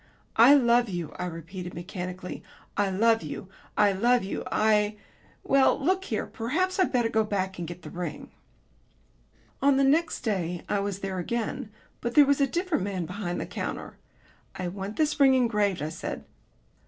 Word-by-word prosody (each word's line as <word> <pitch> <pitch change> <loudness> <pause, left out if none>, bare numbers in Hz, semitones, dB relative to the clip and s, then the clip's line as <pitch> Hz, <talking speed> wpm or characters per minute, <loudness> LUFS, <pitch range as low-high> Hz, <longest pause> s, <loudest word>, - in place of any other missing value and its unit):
"I 240 +6 +9
love 240 -3 +4
you," 175 -4 -4
I - - -1
repeated 175 +2 -7
mechanically. 180 +1 -6 0.3
"I 205 -1 +1
love 225 +4 +3
you. 190 - -7 0.3
I 210 -1 +5
love 235 +5 +3
you, 195 - -4
I 210 -1 +3 0.5
Well, 270 -1 +4
look 370 +6 +1
here, - - -2
perhaps 355 - -1
I'd 370 - +3
better 240 -3 +2
go 220 -1 +2
back 190 -3 -2
and 170 - -4
get 175 +1 -9
the 150 - -9
ring." 175 -3 -6 1.3
On 275 -1 +4
the 275 - +4
next 315 +5 +2
day 180 -6 -2
I 205 - 0
was 200 -1 -3
there 190 -1 -3
again; 225 +3 -3 0.3
but 235 0 -4
there 295 - +8
was 280 0 +2
a 275 - +4
different 345 - -1
man 190 -3 -2
behind 180 0 -4
the - - -3
counter. - - -5 0.6
"I 180 -1 -3
want 195 +3 -6
this 305 -1 +1
ring 270 -2 +6
engraved," 210 - +1
I 155 - -2
said. 160 - -6
210 Hz, 175 wpm, -27 LUFS, 180-255 Hz, 1.3 s, I